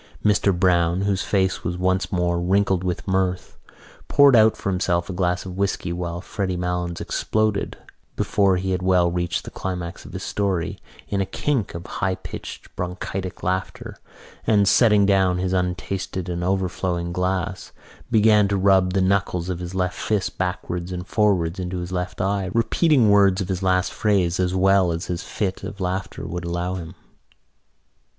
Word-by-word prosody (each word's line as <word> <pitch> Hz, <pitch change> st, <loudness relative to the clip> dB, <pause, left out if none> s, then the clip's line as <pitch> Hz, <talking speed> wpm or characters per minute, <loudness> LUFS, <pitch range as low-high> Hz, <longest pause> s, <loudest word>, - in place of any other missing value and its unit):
Mr 105 Hz, -1 st, +3 dB
Browne, 90 Hz, -1 st, +2 dB
whose 100 Hz, -1 st, 0 dB
face 95 Hz, -2 st, 0 dB
was 90 Hz, +1 st, -2 dB
once 95 Hz, +1 st, 0 dB
more 90 Hz, -2 st, 0 dB
wrinkling 95 Hz, +1 st, +2 dB
with 90 Hz, +1 st, -3 dB
mirth, 95 Hz, -1 st, -1 dB, 0.5 s
poured 140 Hz, -2 st, +6 dB
out 110 Hz, -1 st, +5 dB
for 100 Hz, -, -2 dB
himself 90 Hz, -1 st, 0 dB
a -, -, -5 dB
glass 90 Hz, 0 st, 0 dB
of 90 Hz, -1 st, -7 dB
whisky 95 Hz, -2 st, -1 dB
while 85 Hz, 0 st, -4 dB
Freddy 95 Hz, -2 st, -3 dB
Malins 90 Hz, -1 st, -2 dB
exploded, 110 Hz, -2 st, -1 dB, 0.4 s
before 100 Hz, -2 st, +2 dB
he 95 Hz, +1 st, -2 dB
had 90 Hz, -1 st, -1 dB
well 90 Hz, -2 st, +3 dB
reached 85 Hz, 0 st, -1 dB
the -, -, -8 dB
climax 90 Hz, -2 st, -5 dB
of -, -, -12 dB
his -, -, -5 dB
story, 95 Hz, -5 st, -1 dB, 0.3 s
in 100 Hz, -1 st, 0 dB
a -, -, 0 dB
kink 130 Hz, -, -1 dB
of 85 Hz, -, -6 dB
high 95 Hz, -1 st, -2 dB
pitched 95 Hz, -, -9 dB
bronchitic 90 Hz, +1 st, -5 dB
laughter 95 Hz, 0 st, -3 dB, 0.5 s
and, 100 Hz, -2 st, +4 dB
setting 105 Hz, -1 st, +5 dB
down 95 Hz, -2 st, +3 dB
his 90 Hz, 0 st, -1 dB
untasted 90 Hz, 0 st, -2 dB
and 85 Hz, 0 st, -3 dB
overflowing 90 Hz, -2 st, -1 dB
glass, 90 Hz, +1 st, -2 dB, 0.4 s
began 105 Hz, -3 st, +5 dB
to 100 Hz, 0 st, 0 dB
rub 95 Hz, -1 st, +3 dB
the 95 Hz, -, +2 dB
knuckles 95 Hz, -2 st, 0 dB
of 90 Hz, -2 st, -3 dB
his 90 Hz, +1 st, -6 dB
left 90 Hz, -1 st, -1 dB
fist 105 Hz, -3 st, -1 dB
backwards 90 Hz, -1 st, -3 dB
and 90 Hz, 0 st, -5 dB
forwards 95 Hz, -5 st, +1 dB
into 90 Hz, 0 st, -3 dB
his 90 Hz, 0 st, -5 dB
left 90 Hz, 0 st, -3 dB
eye, 95 Hz, 0 st, 0 dB
repeating 120 Hz, 0 st, +3 dB
words 100 Hz, -2 st, +5 dB
of 95 Hz, -2 st, -3 dB
his 95 Hz, -1 st, -2 dB
last 90 Hz, -1 st, +1 dB
phrase 95 Hz, -5 st, +1 dB
as 90 Hz, 0 st, +1 dB
well 95 Hz, -1 st, +4 dB
as 85 Hz, +2 st, -3 dB
his 90 Hz, 0 st, -3 dB
fit 95 Hz, -2 st, -3 dB
of 100 Hz, -, -7 dB
laughter 95 Hz, 0 st, -3 dB
would 90 Hz, +2 st, -4 dB
allow 85 Hz, +1 st, -2 dB
him. 90 Hz, -1 st, -7 dB
95 Hz, 170 wpm, -23 LUFS, 90-100 Hz, 0.5 s, poured